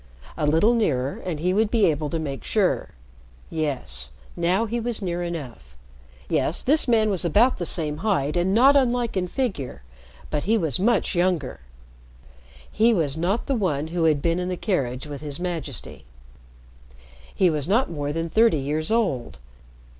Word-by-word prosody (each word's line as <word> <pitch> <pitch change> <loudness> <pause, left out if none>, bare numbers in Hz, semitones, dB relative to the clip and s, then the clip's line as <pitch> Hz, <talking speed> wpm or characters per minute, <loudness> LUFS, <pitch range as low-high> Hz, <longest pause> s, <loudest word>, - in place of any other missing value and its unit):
A 150 - -1
little 165 +10 +4
nearer, 140 - 0
and 170 -5 -3
he 180 +3 +1
would 215 +2 +2
be 225 -3 +3
able 150 -2 0
to 165 - -2
make 140 -4 -5
sure. - - 0 0.6
Yes, 130 - -3 0.3
now 180 +6 +1
he 235 +2 -2
was 235 -1 -1
near 175 -4 -3
enough. 125 - -7 0.5
Yes, 155 - 0
this 300 +3 +3
man 220 -3 +3
was 190 - -1
the 210 +9 +4 0.2
same 150 -3 +1
height 160 -7 0
and 175 +2 +1
not 260 +7 +6
unlike 245 -4 +2
in 185 -1 0
figure, 175 - -3 0.5
but 150 0 -1
he 225 +3 +3
was 160 - -1
much 235 +5 +2
younger. 175 -6 0 1.1
He 230 +1 +3
was 150 -6 0
not 180 +8 -1
the 275 - 0
one 160 - -1
who 170 -1 0
had 150 -3 +2
been 170 +1 +1
in 180 0 -2
the 180 - -3
carriage 135 - -2
with 145 -1 -7
His 145 -1 -6
Majesty. 165 - -5 1.3
He 180 -2 +3
was 150 -1 -2
not 220 +2 +2
more 145 -3 -3
than 165 +2 -2
thirty 220 -1 +3
years 150 +5 -2
old. 195 - 0
170 Hz, 170 wpm, -24 LUFS, 150-215 Hz, 1.3 s, not